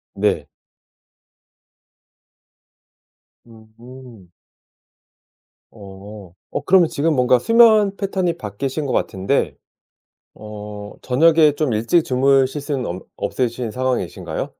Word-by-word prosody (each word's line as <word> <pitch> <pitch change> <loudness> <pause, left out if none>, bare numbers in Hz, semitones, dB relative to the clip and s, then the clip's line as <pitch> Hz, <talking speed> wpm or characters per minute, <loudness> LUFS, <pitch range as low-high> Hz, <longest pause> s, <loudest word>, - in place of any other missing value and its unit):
네. - - 0 3.0
음. 115 -2 -15 1.4
어 100 -2 -12 0.2
어 - - -3
그러면 180 -3 +4
지금 155 +2 0
뭔가 125 0 +3
수면 215 - +4
패턴이 190 -4 -1
바뀌신 135 - -4
것 - - -2
같은데 95 0 -1 0.8
어 105 -1 -9
저녁에 155 +4 +4
좀 145 -6 -1
일찍 115 +10 +2
주무실 135 +2 +2
수는 140 -3 -3
없 90 +2 -6
없으신 120 +1 -3
상황이신가요? 130 0 -3
125 Hz, 185 characters per minute, -20 LUFS, 105-155 Hz, 3.0 s, 그러면